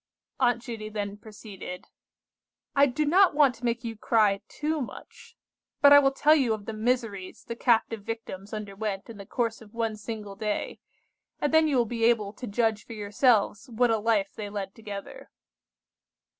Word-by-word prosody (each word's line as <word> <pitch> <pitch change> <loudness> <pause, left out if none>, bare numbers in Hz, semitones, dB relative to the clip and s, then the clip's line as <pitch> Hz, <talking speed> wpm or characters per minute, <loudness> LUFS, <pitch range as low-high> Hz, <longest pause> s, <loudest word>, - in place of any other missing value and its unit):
Aunt 245 -2 +2
Judy 225 -4 -6
then 205 -1 -4
proceeded:— 205 -4 -9 0.9
"I 280 0 +6
do 295 +4 -1
not 360 +3 +5
want 285 -4 +5
to 245 0 -9
make 235 0 -1
you 230 -1 -4
cry 210 -3 +2
too 305 0 -2
much, 250 - -10 0.4
but 285 0 +8
I 285 - +10
will 275 -1 +4
tell 295 +3 +4
you 260 -8 +3
of 205 -2 -11
the 225 - -5
miseries 220 -4 -2
the 230 - -6
captive 225 -2 +2
victims 205 -3 -7
underwent 210 0 -5
in 225 - -11
the 200 - -10
course 230 -2 -2
of 215 0 -15
one 225 -2 -1
single 210 -2 -7
day, 210 +1 -3 0.6
and 295 - 0
then 320 0 +5
you 285 -4 +1
will 240 - +3
be 230 0 -3
able 215 -4 +2
to 245 +3 -8
judge 220 0 0
for - - -10
yourselves 210 +2 +1
what 240 +1 +2
a 225 - +2
life 210 -2 +1
they 210 -1 -6
led 200 -1 -5
together. 205 -3 -9
225 Hz, 180 wpm, -27 LUFS, 205-245 Hz, 0.9 s, I